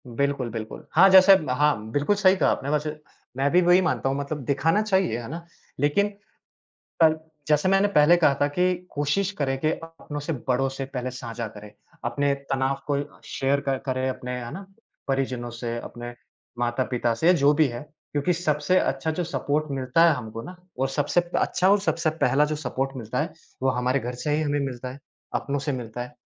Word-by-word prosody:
बिल्कुल, 135 +1 -1
बिल्कुल। 110 -1 -7
हाँ, 190 +4 +7
जैसे 190 +1 +9
ब 155 -7 -2
हाँ, 125 -5 +1
बिल्कुल 145 - +1
सही 195 -2 +4
कहा - - +2
आपने 140 - -3
वैसे। 150 +1 -1 0.4
मैं 135 +1 +2
भी 180 - +5
वही 175 +1 +5
मानता 165 -6 0
हूँ, 135 - -1
मतलब 140 +1 -4
दिखाना 155 - +2
चाहिए, 190 - +1
है 115 - -7
ना? 165 +3 -7 0.3
लेकिन 145 +9 +2 1.0
पर 160 -1 +5 0.3
जैसे 150 +4 +3
मैंने 195 +1 +4
पहले 150 +4 +6
कहा 155 -5 +4
था - - +5
कि 180 +5 +1 0.2
कोशिश 145 +7 0
करें 135 -2 0
कि 155 - +2
अपनों 165 -3 -7
से 155 +3 -3 0.2
बड़ों 130 +1 +2
से 135 0 -5
पहले 130 -1 -3
साझा 120 -2 -6
करें, 105 0 -12 0.3
अपने 140 +4 +1 0.2
तनाव 135 +1 0
को 145 - 0
अ, 145 - -10
शेयर 140 +1 0
कर 135 -1 -1
करें 130 0 0
अपने, 125 -1 -4
है 120 - -7
ना, 190 +5 -8 0.4
परिजनों 130 -3 -1
से, 120 0 -4
अपने 120 0 -8 0.5
माता-पिता 120 0 0
से, 160 - -1
या 180 - +8
जो 145 -4 +4
भी 155 0 +4
है। 120 -1 -6 0.3
क्योंकि 145 +5 +1
सबसे 155 0 +1
अच्छा 135 +4 -1
जो 175 +3 -2
सपोर्ट 155 -2 -1
मिलता 135 +4 +2
है - - +5
हमको 115 -3 -6
ना, 180 +7 -9 0.2
और 135 +1 +1
सबसे 145 +5 +1 0.2
अच्छा 185 +1 +2
और 205 0 +4
सबसे 165 -5 0
पहला 135 +4 +4
जो 150 +1 -2
सपोर्ट 135 -3 -2
मिलता 115 -3 -3
है, - - -2 0.3
वो 130 - +3
हमारे 125 +1 0
घर 125 +1 -5
से 150 -1 +1
ही 155 - 0
हमें 145 -1 0
मिलता 130 -2 -4
है, 135 - -11 0.4
अपनों 145 0 -1
से 140 +1 -2
मिलता 120 -2 -5
है। 125 0 -10
140 Hz, 205 wpm, -25 LUFS, 125-160 Hz, 1.0 s, जैसे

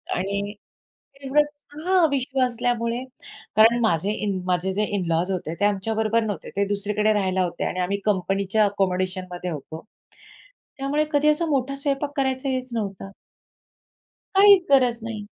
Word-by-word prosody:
आणि 200 +2 -2 0.7
एवढंच. 295 +2 0 0.2
हां, 365 -2 +4
विश्व 270 -1 -2
असल्यामुळे, 240 0 -1 0.5
कारण 225 +2 +6
माझे 200 -3 +1
इन 195 -2 -1
माझे 185 +1 0
जे 210 +2 0
इन-लॉज् 175 0 0
होते 175 -4 -3
ते 205 - +2
आमच्याबरोबर 220 +2 +1
नव्हते. 205 -3 -4
ते 200 - +2
दुसरीकडे 210 +1 0
राहायला 190 -2 +1
होते 175 - -3
आणि 185 - -3
आम्ही 190 +3 -1
कंपनीच्या 195 +1 +1
आकोमोडेशनमध्ये 185 -2 -2
होतो. 160 +3 -8 0.9
त्यामुळे 285 +3 0
कधी 290 0 +2
असा 300 +3 +2
मोठा 275 -1 0
स्वयंपाक 280 +1 -2
करायचं 265 0 0
हेच 255 -1 -2
नव्हतं. 195 -3 -4 1.2
काहीच 395 -1 +7
गरज 255 -4 +4
नाही. 220 -2 -5
215 Hz, 135 wpm, -24 LUFS, 190-265 Hz, 1.2 s, काहीच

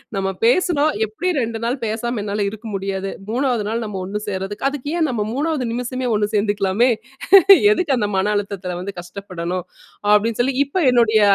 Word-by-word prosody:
நம்ம 195 0 -1 0.2
பேசுனோம், 310 +3 +3
எப்டி 325 - -2
2 230 -2 -2
நாள் 245 +4 0
பேசாம 225 +1 -2
என்னால 205 0 -1
இருக்க 220 +2 -9
முடியாது, 195 0 -3
நாள் 195 - -15
3ஆவது 240 -3 0 0.2
நம்ம 205 -3 -5
ஒண்ணு 205 +3 -4
சேர்றதுக்கு, 195 +4 -4
அதுக்கு 285 0 -6
ஏன் 315 - +2
நம்ம 220 -4 -1
3ஆவது 290 -2 -1
நிமிஷமே 250 +1 -3
ஒண்ணு 210 0 0
சேர்ந்துக்கலாமே? 205 +2 +2 0.8
எதுக்கு 345 -10 +1
அந்த 210 -2 0
மன 205 +2 +1
அழுத்தத்துல 195 -3 -3
வந்து 200 +1 -6
கஷ்டப்படணும். 180 -1 -5 0.5
அப்டின்னு 220 +2 +1
சொல்லி 260 +1 -1
இப்ப 315 +5 -1
என்னுடைய 230 -3 +4
215 Hz, 165 wpm, -20 LUFS, 200-250 Hz, 0.8 s, என்னுடைய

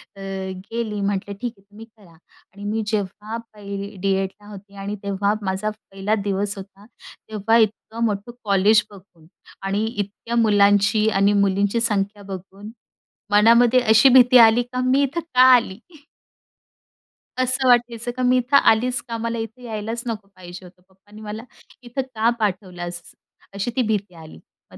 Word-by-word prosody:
तर 195 -1 -6 0.2
गेली 220 -3 -3
म्हटलं, 200 0 -2
"ठीक 245 -1 -3
आहे - - -23
तुम्ही 215 +2 -12
करा" 215 -6 -22
आणि 190 +4 -18
मी 215 +2 -2
जेव्हा 210 +1 -3 0.2
पहिली 200 0 -7
डीएडला 195 +1 -2
होती 200 0 -13
आणि 205 +1 -4
तेव्हा 200 +1 0
माझा 195 +1 -2
पहिला 210 -1 -4
दिवस 200 +1 -2
होता, 195 +1 -12 0.4
तेव्हा 220 +1 +1
इतकं 220 +1 -1
मोठं 210 +2 -3
कॉलेज 205 +1 +3
बघून 180 -5 -18 0.4
आणि 200 +3 -1
इतक्या 220 +1 -5
मुलांची 210 -1 +3
आणि 200 0 +2
मुलींची 200 +4 0
संख्या 205 -2 -1
बघून 195 +3 -10 0.6
मनामध्ये 235 +4 +5
अशी 225 +3 +5
भीती 250 0 +7
आली 230 0 +7
का 250 +1 -4
मी 270 +2 +3
इथं 280 +5 -2 0.2
का 250 - +7
आली? 230 -5 -1 1.6
असं 255 +1 0
वाटायचं 240 -1 +2
का 255 - -1
मी 250 0 +4
इथं 250 +3 +3
आलीच 245 +1 +3
का? 230 -1 -4
मला 230 +1 -3
इथे 225 +3 -7
यायलाच 225 0 -5
नको 220 -3 -5
पाहिजे 180 0 -11
होतं. 180 0 -17
पप्पांनी 205 +3 -17
मला 215 +1 -7 0.4
इथं 245 +3 -4
का 220 +2 +2
पाठवलास 180 -4 -3 0.5
अशी 200 +4 -3
ती 255 - +2
भीती 200 -4 -2
आली. 160 - -13 0.3
मग, - - -13
210 Hz, 155 wpm, -21 LUFS, 195-230 Hz, 1.6 s, भीती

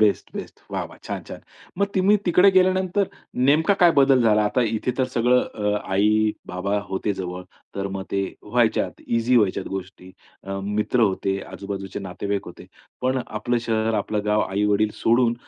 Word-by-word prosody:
Best, 105 -2 +2
best, - - -8
वाह, - - -2
वाह! - - -13
छान, - - -4
छान. - - -9 0.4
मग 200 - +3
तुम्ही 195 +2 +4
तिकडे 180 +3 +6
गेल्यानंतर, 185 +1 +2 0.4
नेमका 160 +7 +4
काय 175 - +8
बदल 135 -2 +5
झाला? 105 -2 +4
आता 115 +4 +1
इथे 120 - -1
तर 130 - +3
सगळं 125 +2 +4
अ, 105 -1 -2 0.2
आई-बाबा 105 -1 +1
होते 95 +2 -1
जवळ, 90 -1 -5 0.3
तर 100 0 -2
मग 95 - -4
ते 100 0 0 0.2
व्हायच्यात - - 0
ईझी 115 +2 +2
व्हायच्या 105 -5 +2
गोष्टी, 95 -1 -7 0.3
अ 95 0 -5
मित्र 105 +4 0
होते, 95 -2 +1
आजूबाजूचे 100 -1 -6
नातेवाईक 100 +1 -4
होते, 90 - -11 0.4
पण 130 0 +1
आपलं 120 +3 -1
शहर, 110 0 +1
आपलं 105 0 -1
गाव, 105 0 +2
आईवडील 105 +2 +1
सोडून, 120 0 +2
105 Hz, 165 wpm, -23 LUFS, 100-125 Hz, 0.4 s, काय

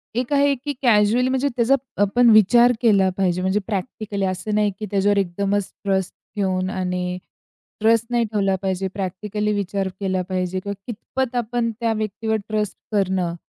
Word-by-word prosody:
एक 245 +3 -2
आहे 285 0 +4
की 285 +3 -5
कॅज्युअली 235 +1 +3
म्हणजे 265 +2 +1
त्याचा 240 +3 +3 0.3
आपण 235 +4 +4
विचार 235 +4 +6
केला 200 -5 +4
पाहिजे, 180 -2 +1
म्हणजे 190 +2 +1
प्रॅक्टिकली 200 -1 -3
असं 185 +3 -2
नाही 210 -1 +2
की 215 - -3
त्याच्यावर 200 +1 +2
एकदमच 200 +1 -1
ट्रस्ट 190 -2 0 0.2
ठेऊन 185 -2 0
आणि 180 -1 -2 0.6
ट्रस्ट 230 +1 +4
नाही 240 -1 +2
ठेवला 200 -3 0
पाहिजे. 190 0 -1
प्रॅक्टिकली 210 +2 -3
विचार 200 -1 -1
केला 190 -2 -1
पाहिजे 185 0 -1
किंवा 200 +2 -5
कितपत 245 +2 -4
आपण 235 0 -1
त्या 230 -1 +1
व्यक्तीवर 220 +1 -2
ट्रस्ट 210 -1 -1
करणं 190 -4 0
205 Hz, 155 wpm, -22 LUFS, 190-230 Hz, 0.6 s, विचार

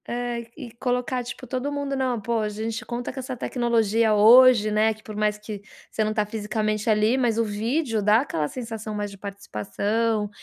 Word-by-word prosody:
Eh, 240 -1 -3
e 235 - -8
colocar, 250 0 -1
tipo, 245 +1 -8
todo 255 +3 -3
mundo. 285 -1 -2
Não, 255 -3 0
pô, 230 +2 -1
a 215 -1 -1
gente 220 +2 -4
conta 245 +1 -4
com 270 - -6
essa 260 -1 -5
tecnologia 230 -3 +1
hoje, 225 0 +7
né, 215 +1 +3
que 215 - -20
por 215 - -8
mais 210 0 0
que 210 -1 -8 0.3
você 220 - 0
não 215 - 0
tá 210 -1 +1
fisicamente 215 0 -2
ali, 215 +3 +3
mas 235 -3 +1
o 230 - +3
vídeo 225 +3 -1
dá 210 +3 +4
aquela 160 - -2
sensação 225 - -6
mais 205 -1 -3
de 200 - -12
participação 205 - -2
225 Hz, 195 wpm, -24 LUFS, 210-245 Hz, 0.3 s, hoje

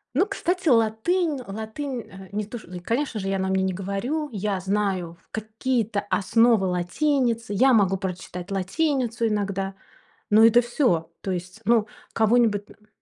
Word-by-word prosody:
Ну 350 +8 +4
кстати 360 -3 -1
латынь, 270 +8 +2
латынь, 220 +6 -5
э, 190 0 -12
не 210 +1 -2
то, 230 +4 -7
ш 220 - -13
и, 180 0 -7
конечно 230 +5 -2
же, 195 - -4
я 195 0 0
на 190 0 -1
мне 190 0 +1
не 190 0 0
говорю. 200 - -3
Я 205 -2 -2
знаю 190 -3 -1
какие-то 220 0 -1
основы 225 +1 +3
латиницы, 230 - 0
я 260 +6 +5
могу 195 -4 +3
прочитать 180 -1 -6
латиницу 235 - 0
иногда, 195 -2 -2 0.5
но 220 +1 +7
это 230 +2 +6
всё. 235 - 0
То 195 - -3
есть, 180 +3 -5
ну 225 -2 +3 0.3
кого-нибудь 220 -2 +2
н 210 - -21
215 Hz, 155 wpm, -24 LUFS, 190-240 Hz, 0.5 s, но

